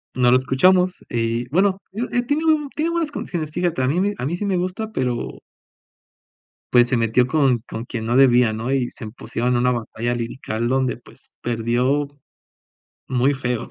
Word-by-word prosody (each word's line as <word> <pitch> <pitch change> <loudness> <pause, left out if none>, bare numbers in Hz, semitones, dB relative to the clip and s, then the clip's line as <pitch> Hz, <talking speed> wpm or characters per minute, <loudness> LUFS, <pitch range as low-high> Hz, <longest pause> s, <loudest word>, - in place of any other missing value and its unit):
no 125 -1 +4
lo 125 - +6
escuchamos. 180 +8 +3
Y 115 +1 -1
bueno, 190 +4 +2
digo, 225 +6 -3
eh, 245 0 +1
tiene 290 +5 -1
buen 305 -3 +2
tiene 320 +2 0
buenas 335 -3 -1
condiciones. 160 - -4
Fíjate, 170 -3 -1
a 130 - +1
mí 160 +7 +1
me 205 +1 +1
a - - -3
mí, 165 +5 -1
sí, 205 - -3
me 195 -2 +1
gusta, 185 +5 -3
pero 125 - -2 1.3
pues, 120 -1 +6
se 125 - +1
metió 115 +2 +3
con 135 -3 +2
con 115 +2 -6
quien 115 -3 -5
no 120 +2 0
debía, 125 -4 +5
¿no?, 115 +4 -3
y 130 -3 0
se 110 - -8
pusieron 120 +2 -2
en - - +2
una 125 +1 +2
batalla 120 0 -2
lírica 115 -1 -3
donde, 130 -1 0
pues, 120 - -16
perdió, 120 +5 0 1.0
muy 130 +3 +2
feo. 125 -3 -3
130 Hz, 190 wpm, -21 LUFS, 120-180 Hz, 1.3 s, lo